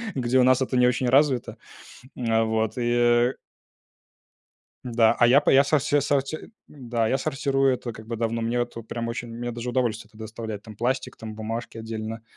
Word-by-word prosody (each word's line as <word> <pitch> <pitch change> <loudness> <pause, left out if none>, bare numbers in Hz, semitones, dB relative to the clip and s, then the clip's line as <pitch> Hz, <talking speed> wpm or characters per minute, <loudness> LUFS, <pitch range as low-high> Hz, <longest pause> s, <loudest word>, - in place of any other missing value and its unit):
где 130 0 +1
у - - +5
нас 130 +1 +4
это 130 0 0
не 125 0 +5
очень 125 +1 0
развито. 135 -2 +2 0.7
А 115 0 +3
вот 110 -1 0
и 120 +1 +3 1.5
Да, 115 -2 +3
а 120 - +6
я 130 +4 +6
по - - +2
я 135 +1 +6
со 150 +2 +3
со 145 +1 +1
сорти 140 +5 -2 0.2
да, 120 -5 -2
я 135 - +1
сортирую 135 0 +1
это 120 -1 -6
как 110 0 -12
бы 115 0 -4
давно. 115 0 -1
Мне 115 +2 -1
вот 120 - -3
прям 115 0 -4
очень, 115 +1 -5
мне 120 +1 -5
даже 120 +1 -5
удовольствие 115 -3 -1
это 110 - -19
доставляет: 110 -1 -6
там 110 -1 -12
пластик, 130 +4 -2
там 110 -1 -8
бумажки 115 +2 -5
отдельно, 110 0 -6
120 Hz, 190 wpm, -25 LUFS, 115-130 Hz, 1.5 s, а